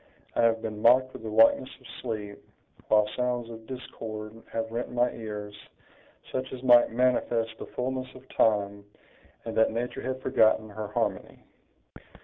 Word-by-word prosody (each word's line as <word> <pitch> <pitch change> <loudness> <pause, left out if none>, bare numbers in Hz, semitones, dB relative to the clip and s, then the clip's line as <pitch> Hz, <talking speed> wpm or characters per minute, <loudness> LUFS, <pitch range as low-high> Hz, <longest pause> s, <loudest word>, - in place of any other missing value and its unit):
I - - +3
have 115 -1 +3
been 105 -1 -4
mocked 130 +3 +5
with - - -9
the 110 - -5
likeness 115 +4 +5
of - - -21 0.2
sleep, 105 -4 -5 0.5
while 105 -1 +4
sounds 125 -2 -1
of 110 -1 -11
discord 110 -4 -7 0.2
have 115 0 -3
rent 120 +2 -3
my 125 0 +2
ears, 105 -2 -6 0.8
such 130 0 -3
as 130 -1 -7
might 120 -2 +7
manifest 120 -2 +1
the - - -7
fullness 130 +1 -2
of 130 +1 -14
time, 100 -2 +2 0.6
and 115 - -5
that 110 - +4
nature 120 +2 -3
had 130 0 -3
forgotten 110 -1 +3
her 105 +1 -5
harmony." 105 - -3
115 Hz, 155 wpm, -28 LUFS, 110-125 Hz, 0.8 s, might